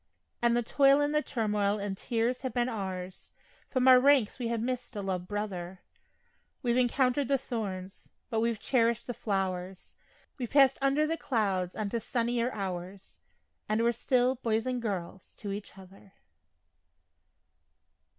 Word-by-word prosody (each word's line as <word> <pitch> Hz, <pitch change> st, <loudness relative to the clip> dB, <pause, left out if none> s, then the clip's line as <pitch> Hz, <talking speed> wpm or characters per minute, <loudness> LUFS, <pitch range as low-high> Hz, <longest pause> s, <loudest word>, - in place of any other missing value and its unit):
And 235 Hz, 0 st, +3 dB
the 240 Hz, -, +1 dB
toil 275 Hz, +4 st, +4 dB
and 290 Hz, 0 st, +1 dB
the 300 Hz, -, +3 dB
turmoil 210 Hz, -6 st, 0 dB
and 200 Hz, -1 st, -3 dB
tears 235 Hz, +4 st, -1 dB
have 260 Hz, -1 st, -4 dB
been 240 Hz, 0 st, +2 dB
ours 190 Hz, -4 st, -6 dB, 0.4 s
From 255 Hz, -1 st, +1 dB
our 255 Hz, -1 st, +9 dB
ranks 265 Hz, -4 st, +3 dB
we 240 Hz, -, -2 dB
have 230 Hz, 0 st, -1 dB
missed 250 Hz, +1 st, -3 dB
a 205 Hz, -, -3 dB
loved 180 Hz, -2 st, -3 dB
brother 190 Hz, -3 st, -4 dB, 0.8 s
We've 240 Hz, -1 st, +2 dB
encountered 255 Hz, +2 st, +2 dB
the 275 Hz, -, +3 dB
thorns, 195 Hz, -7 st, -6 dB, 0.2 s
but 225 Hz, -, +1 dB
we've 230 Hz, -1 st, 0 dB
cherished 235 Hz, 0 st, +1 dB
the 245 Hz, -, -4 dB
flowers; 190 Hz, -3 st, -3 dB, 0.4 s
We've 245 Hz, -3 st, -3 dB
passed 275 Hz, -2 st, +5 dB
under 275 Hz, +3 st, +3 dB
the 325 Hz, +2 st, -1 dB
clouds 195 Hz, -, -1 dB
on 215 Hz, -2 st, -2 dB
to 235 Hz, -, -1 dB
sunnier 235 Hz, +1 st, -1 dB
hours, 190 Hz, -2 st, -6 dB, 0.5 s
And 215 Hz, +2 st, +2 dB
we're 235 Hz, -, +4 dB
still 250 Hz, +2 st, +2 dB
"boys" 225 Hz, 0 st, 0 dB
and 250 Hz, -1 st, -2 dB
"girls" 190 Hz, -4 st, -5 dB
to 205 Hz, -, -6 dB
each 200 Hz, -1 st, -7 dB
other. 195 Hz, +1 st, -15 dB
230 Hz, 155 wpm, -30 LUFS, 195-250 Hz, 0.8 s, our